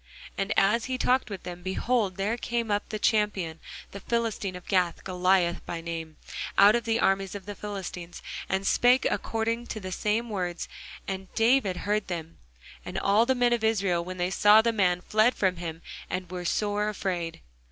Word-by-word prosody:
And 195 +2 -2
as 210 +4 +3
he 260 0 -2
talked 255 0 +2
with 200 -3 -6
them, 180 0 -7
behold, 190 +1 0
there 205 +4 0
came 235 -2 -2
up 205 0 -1
the 215 - -3
champion, 205 -7 +1 0.3
the 200 - -7
Philistine 225 -4 -2
of 180 - -9
Gath, 180 -3 +1
Goliath 180 -1 +2
by 170 - -3
name, 165 -1 -6 0.4
out 200 +2 +8
of 235 - -1
the 225 0 +1
armies 195 0 +1
of 200 - -7
the 205 - -5
Philistines, 190 -4 -7 0.3
and 190 +1 0
spake 250 +5 +4
according 230 +1 -1
to 215 - -5
the 185 -2 -6
same 215 +5 0
words: 180 -4 -3 0.4
and 190 -1 -5
David 225 -5 +3
heard 210 0 0
them. 165 -2 -6 0.4
And - - -6
all 210 +4 +3
the 260 - +3
men 245 -1 +3
of 235 -2 -1
Israel, 195 -6 +1
when 185 +1 -7
they 180 +1 -1
saw 210 +3 +6
the 230 0 +2
man, 180 -4 +2
fled 215 +6 +3
from 185 -3 +1
him, 165 -1 -6 0.3
and 185 -1 -4
were 180 -1 -5
sore 210 +3 0
afraid. 180 -5 -3
195 Hz, 185 wpm, -27 LUFS, 180-220 Hz, 0.4 s, out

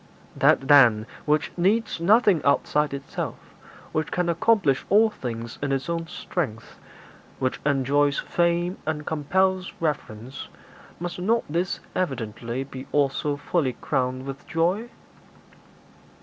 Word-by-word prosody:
'That, 135 - +3
then, 120 -7 +6 0.2
which 150 0 +1
needs 205 +3 +1
nothing 205 -2 +4
outside 145 +1 +2
itself, 140 0 -4 0.6
which 155 0 -2
can 180 -1 0
accomplish 170 - +2
all 220 +3 +5
things 115 - -6
in 140 -1 -1
its 135 +2 -1
own 165 -1 -2
strength, 150 -9 -5 0.6
which 130 -1 -1
enjoys 140 +1 +2
fame 175 +1 0
and 150 -1 -2
compels 185 +5 0
reverence, 130 -5 -4 0.5
must 175 0 -5
not 225 +6 +1
this 170 +4 -2
evidently 120 - -3
be 135 -1 -9
also 145 0 +1
fully 145 -2 0
crowned 130 -1 -2
with 135 0 -8
joy?' 180 +8 0
150 Hz, 120 wpm, -25 LUFS, 135-175 Hz, 0.6 s, then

